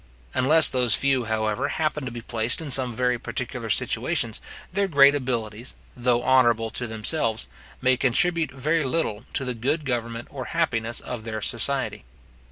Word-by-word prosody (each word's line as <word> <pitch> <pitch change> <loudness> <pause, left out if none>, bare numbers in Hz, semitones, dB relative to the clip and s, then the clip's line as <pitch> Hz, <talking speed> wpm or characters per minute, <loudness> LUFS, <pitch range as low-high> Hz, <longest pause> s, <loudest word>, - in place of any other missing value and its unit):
Unless 155 +4 +6
those 125 -4 +2
few, 135 -3 +1
however, 110 -1 -1
happen 155 -3 -2
to - - -3
be 120 0 -7
placed 115 0 -1
in 155 -4 -4
some 130 -1 +3
very 125 0 +1
particular - - -5
situations, - - 0 0.3
their 200 0 +1
great 140 -4 +6
abilities, 120 -4 -3 0.2
though 120 -1 +1
honourable 120 -4 +3
to 120 - -3
themselves, 110 - 0 0.4
may 130 -1 +4
contribute 165 +6 +2
very 150 +5 0
little 130 -5 -2
to 135 - -1
the 125 - -2
good 140 +7 -2
government 120 -2 -3
or 130 -3 -6
happiness 120 -9 -1
of 120 -3 -6
their 110 -1 -4
society. 130 +5 0
125 Hz, 160 wpm, -24 LUFS, 115-140 Hz, 0.4 s, Unless